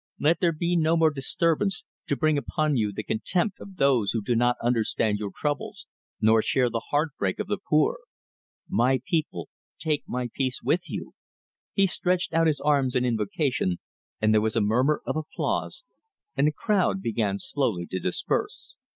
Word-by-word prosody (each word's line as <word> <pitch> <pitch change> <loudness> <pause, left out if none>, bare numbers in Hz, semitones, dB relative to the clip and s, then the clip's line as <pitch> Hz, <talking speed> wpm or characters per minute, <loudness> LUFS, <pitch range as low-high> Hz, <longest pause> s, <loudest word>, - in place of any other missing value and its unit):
Let 160 +3 +3
there 175 -2 +3
be 170 +2 -1
no 165 0 +3
more 160 -1 +4
disturbance, 165 +7 0 0.2
to - - +1
bring 155 -2 +2
upon 150 +1 0
you 105 -4 +1
the 110 - -5
contempt 175 - -1
of 195 - -11
those 130 - +3
who 115 -3 -1
do 120 - 0
not 120 +1 +3
understand 110 -3 +1
your 105 -1 -3
troubles, 145 +8 -3 0.3
nor 110 +1 +5
share 125 +1 +1
the 115 0 -3
heartbreak 145 - 0
of - - -2
the 205 0 -2
poor. 155 - +2 0.7
My 130 +2 +2
people, 165 -4 -1 0.3
take 155 -3 0
my 125 0 -2
peace 130 -3 -1
with 155 +8 0
you!" - - -6 0.6
He 195 - +4
stretched 180 -1 0
out 165 0 +4
his 150 -3 +1
arms 140 -4 +2
in 125 0 +2
invocation, 115 - 0 0.4
and 110 0 +3
there 110 - +4
was 110 +1 -1
a - - +3
murmur 125 +8 +2
of - - -2
applause, 155 - -3 0.5
and 140 +2 +3
the - - +3
crowd 195 +2 0
began 105 -3 0
slowly 105 -7 -1
to 95 - -1
disperse. 90 - -2
140 Hz, 175 wpm, -26 LUFS, 115-160 Hz, 0.7 s, nor